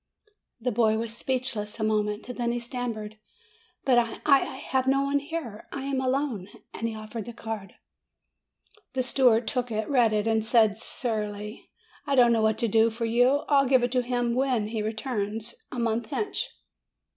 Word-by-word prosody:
The 250 +2 -1
boy 220 -1 +3
was 225 0 -3
speechless 240 -4 -2
a - - -1
moment. 210 0 0
Then 240 -1 0
he 240 - -1
stammered, 235 -3 -5 0.7
"But 250 -3 +5
I 230 -1 -2
I 275 -2 +5
have 260 -1 -1
no 275 +1 +3
one 280 +1 +1
here! 285 -8 -6
I 275 - -5
am 270 -1 -1
alone 260 -7 -1
!" - - -44
and 230 - -2
he 225 - -6
offered 215 0 -6
the 240 - -7
card. 220 -3 -6 1.2
The 260 -1 0
steward 245 -3 +3
took 245 -1 -1
it, 220 -1 -2
read 245 -6 +4
it, 210 0 +1
and 220 -1 +2
said 220 -2 +3
surlily: 210 -3 -4 0.4
"I 280 - +2
don't 240 -2 +6
know 225 - +2
what 220 0 +2
to 235 - +1
do 225 +1 +4
for 230 +1 -3
you. 245 +5 +3
I'll 275 -2 +4
give 260 -2 +5
it 245 - +1
to 250 -1 +2
him 245 -1 0
when 250 -4 +1
he 220 -1 -2
returns 220 0 -3 0.2
a - - -6
month 230 -1 0
hence." 420 - -2
235 Hz, 185 wpm, -27 LUFS, 220-255 Hz, 1.2 s, don't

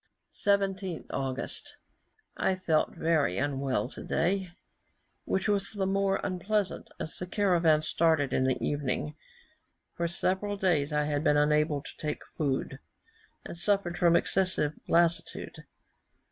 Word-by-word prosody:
17th 195 -3 0
August. 135 -1 -4 0.6
I 190 - +1
felt 165 -4 +1
very 155 - +1
unwell 135 -4 0
today, 185 +7 -1 0.8
which 190 - 0
was 200 0 0
the 200 -2 -1
more 195 0 +1
unpleasant, 195 +1 -1
as 160 - -5
the 180 - -5
caravan 175 -6 +3
started 160 -3 +2
in 130 - +2
the 130 -1 +2
evening. 145 +1 -2 0.8
For 170 - -1
several 190 +4 -1
days 165 -7 +1
I 150 0 +2
had 145 0 -1
been 150 -2 +4
unable 150 0 +2
to - - -11
take 150 -1 -2
any - - -25
food, 140 -4 -1 0.7
and - - -7
suffered 175 -1 0
from 170 -1 +4
excessive 180 -7 +1
lassitude. 170 0 0
170 Hz, 130 wpm, -29 LUFS, 150-190 Hz, 0.8 s, been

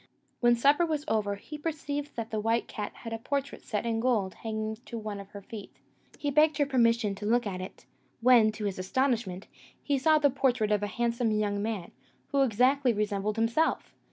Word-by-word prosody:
When 240 -1 +5
supper 285 +7 +4
was 310 -3 -1
over, 210 -5 0
he 295 +9 -9
perceived 290 -2 -4
that 230 -1 -5
the 215 - -1
white 225 +2 0
cat 210 -2 -5
had 230 - -7
a 225 - -3
portrait 280 +3 -3
set 215 0 -3
in 225 -1 0
gold 225 -6 +1
hanging 220 -1 -4
to 235 - -5
one 210 -2 -5
of 200 0 -10
her 200 -1 -10
feet. 210 0 -8 0.5
He 290 - -2
begged 300 +1 +4
her 290 - +3
permission 230 -5 +2
to 200 +1 -7
look 240 +2 +2
at 185 -3 -4
it; 185 - -9 0.3
when, 235 -2 +6
to 215 -1 -5
his 195 -2 -2
astonishment, 215 -2 -1 0.4
he 285 -2 +1
saw 310 +3 +5
the 290 -2 +3
portrait 250 -5 +1
of 210 -1 +2
a 205 - -1
handsome 235 +1 0
young 210 -1 0
man, 210 -5 -3 0.4
who 280 - +2
exactly 255 +2 +3
resembled 210 0 -1
himself! 230 +8 0
230 Hz, 200 wpm, -29 LUFS, 210-270 Hz, 0.5 s, when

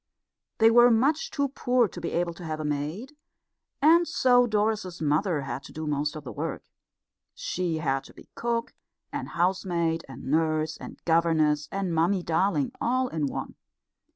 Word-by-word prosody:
They 225 0 +6
were 240 +1 +7
much 285 - +2
too 280 - -1
poor 250 -3 +2
to 175 - -9
be 170 - -2
able 170 0 0
to 175 - -11
have 155 -1 -4
a 155 - -3
maid, 155 - -3 0.7
and 335 +3 +6
so 245 -1 +4
Doris's 210 -4 -1
mother 155 +2 +1
had 135 0 -5
to - - -11
do 155 0 -6
most 150 0 -1
of 155 - -7
the 125 - -7
work. - - -4 0.7
She 175 -3 -2
had 135 -3 -1
to - - -14
be - - -15
cook 235 0 -2 0.4
and - - -4
housemaid 170 -2 0
and 130 - -10
nurse 155 +1 +1
and - - -10
governess 160 -3 +2
and 195 -3 -2
Mummy 175 +3 +2
darling 165 -3 +1
all 255 +1 +1
in 155 -7 -1
one. - - -5
170 Hz, 170 wpm, -27 LUFS, 155-225 Hz, 0.7 s, were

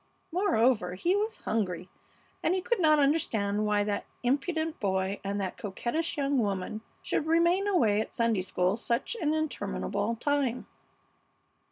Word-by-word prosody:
Moreover, 235 - +2
he 345 - +1
was 430 +2 -1
hungry, 185 -5 -2 0.5
and 350 - +2
he 375 - 0
could 475 0 0
not 310 -3 +5
understand 220 -9 +1
why 210 -1 +2
that 205 0 -2 0.2
impudent 315 +5 0
boy 190 0 0
and 200 +1 -2
that 190 -2 -3
coquettish 240 - -2
young 280 -1 +1
woman 205 0 -2 0.2
should 310 - -1
remain 340 +4 +3
away 220 - +3
at - - -7
Sunday 230 -5 +2
school 180 +1 0
such 235 - -1
an 305 -1 +1
interminable 310 -6 -2
time. 270 -1 0
235 Hz, 145 wpm, -29 LUFS, 205-320 Hz, 0.5 s, not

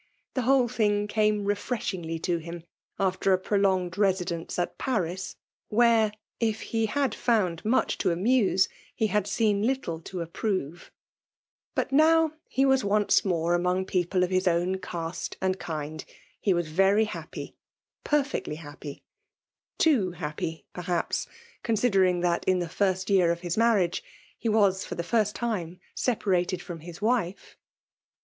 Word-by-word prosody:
The 260 - 0
whole 255 0 +4
thing 210 -3 +1
came 210 -1 +1
refireshin^y 190 -6 -2
to 175 -2 0
him 170 +1 -8 0.3
after 190 0 +1
a - - +4
prolonged 190 -2 0
residence 180 -4 0
at 175 - -2
Paris; 190 -7 -2 0.3
where* 225 -1 +4 0.3
if 225 -2 0
he 225 -1 -1
had 270 0 0
found 195 -10 +1
much 230 +4 +1
to - - +2
amuse, 195 +1 +3 0.3
he 220 - +1
had 210 -2 +1
seen 205 -1 +1
little 225 -9 -1
to 170 +1 -5
apfxrova 170 -3 -3 0.9
But - - -1
now, 320 +2 +5 0.2
he 270 - +2
was 265 -1 +3
once 205 0 +3
more 175 -2 +1
^'■^^"^S 180 +1 0
people 180 0 +1
of 180 - -1
his 185 0 +1
own 180 +2 +1
caste 170 -2 -5
and 185 0 0
kind, 155 -2 -5 0.4
he 200 - +1
was 175 -2 +1
very 195 +7 +3
hiqppy 215 - -7 0.3
— - - -68
^perfi^ctly 285 - 0
happy 145 -2 -9 0.4
— - - -67
too 220 - +3
happy 160 -1 -5
perihapsy 175 -1 -2 0.3
considering 195 -6 +2
that 175 -1 +1
in 185 -1 +3
the 175 - -1
irst 185 +2 0
year 180 -3 +4
of 170 +1 -4
Us 175 - -1
marriage* 215 -6 +2 0.4
he 230 - -1
was 200 -3 +3
for - - -6
the 170 - -3
first 210 +2 +1
time 185 -7 -3 0.2
sepa 245 -4 -1
rated 180 -2 +1
firom 170 -3 -8
his 175 +4 -10
wife. 215 -5 -1
190 Hz, 155 wpm, -27 LUFS, 175-220 Hz, 0.9 s, now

